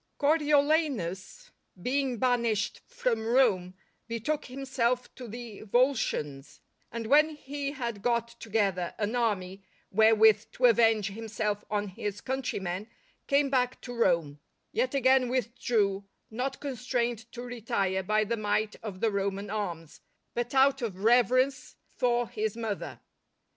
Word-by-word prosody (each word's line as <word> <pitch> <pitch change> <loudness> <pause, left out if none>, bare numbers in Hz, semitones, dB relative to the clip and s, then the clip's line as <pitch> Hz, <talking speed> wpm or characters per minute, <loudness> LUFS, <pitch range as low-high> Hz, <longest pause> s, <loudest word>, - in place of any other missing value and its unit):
_ - - -48
Coriolanus 295 - +1 0.3
being 260 +4 0
banished 235 -4 0
from 230 -3 -1
Rome 220 -7 +2 0.3
betook 235 +6 -2
himself 255 -2 -1
to 250 - -9
the 230 -1 -8
Volscians, 215 - 0 0.3
and 230 -1 -4
when 300 +5 +4
he 285 -1 -5
had 235 -7 -4
got 235 0 0
together 200 -5 -1
an 215 +3 -1
army 200 -5 -1 0.3
wherewith 220 0 +5
to 255 - +2
avenge 225 -3 +4
himself 215 -1 -3
on 210 -1 -1
his 205 +2 -5
countrymen, 210 -8 -3 0.4
came 280 -1 +2
back 255 -1 +1
to 245 - -7
Rome; 170 -10 +1 0.3
yet, 485 - 0
again 260 -1 +4
withdrew, 230 -5 0 0.3
not 260 +4 -3
constrained 240 -4 -2
to 245 - -6
retire 225 -6 -1
by 215 +3 +1
the 230 +2 -2
might 215 0 -1
of 200 -4 -7
the 225 - +2
Roman 200 0 -2
arms, 170 -7 -5 0.3
but 240 +2 -3
out 270 0 +4
of 200 -5 -4
reverence 255 +3 +3 0.2
for 245 -2 +1
his 220 -2 -3
mother. 225 -3 -4
230 Hz, 130 wpm, -29 LUFS, 205-255 Hz, 0.4 s, wherewith